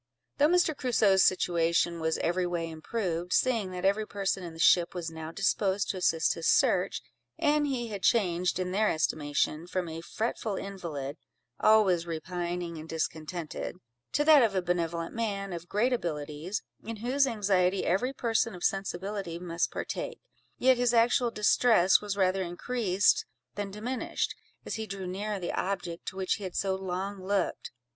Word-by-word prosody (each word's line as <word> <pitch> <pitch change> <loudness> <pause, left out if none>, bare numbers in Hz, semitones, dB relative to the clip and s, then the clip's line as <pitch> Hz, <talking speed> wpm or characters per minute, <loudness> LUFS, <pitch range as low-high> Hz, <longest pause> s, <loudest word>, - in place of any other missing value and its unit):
Though 290 - +6
Mr. 345 -2 +3
Crusoe's 220 -8 +3
situation 170 -1 +2
was 160 0 0
every 175 +1 0
way 170 -2 -3
improved, 175 0 -3
seeing 230 -7 +2
that 180 0 -4
every 210 +2 +2
person 195 -2 -2
in 170 -2 -7
the - - -12
ship 175 +1 +4
was 170 -2 -4
now 160 0 -7
disposed 195 +2 +1
to 190 - -6
assist 165 -3 +2
his 165 - -3
search, - - +3 0.3
and 300 -2 +2
he 245 -4 -2
had 200 -3 -5
changed, 180 -6 +2
in 180 0 -2
their 210 +3 +2
estimation, 155 +1 0
from 180 -1 -2
a 165 0 -6
fretful 215 +3 -3
invalid 170 -8 -5 0.4
(always 190 -6 +4
repining 175 0 -4
and 160 +1 -10
discontented), 160 +1 -4 0.4
to 295 - +2
that 305 -2 +8
of 220 -5 +2
a 185 - +2
benevolent 170 -1 -1
man, 200 -4 -2
of 170 0 -7
great 235 +5 +2
abilities, 155 -1 -3 0.2
in 230 +1 -5
whose 275 +2 +3
anxiety 195 -5 +1
every 200 +9 +1
person 230 -4 0
of 175 - -9
sensibility 195 -2 -2
must 175 -1 -1
partake, 475 - -4 0.4
yet 260 0 +4
his 245 -1 +2
actual 240 +1 +4
distress 210 -3 +4
was 205 -1 -3
rather 190 0 +2
increased 190 +2 +1 0.3
than 205 -1 -4
diminished, 225 +5 -3 0.3
as - - -4
he 220 0 -4
drew 195 -2 -5
nearer 200 +3 -3
the 175 - -3
object 180 -3 -3
to - - -4
which 190 -1 0
he 210 - -9
had 185 -2 -6
so 195 -1 0
long 190 +1 -4
looked. 195 -1 -1
190 Hz, 165 wpm, -29 LUFS, 170-215 Hz, 0.4 s, that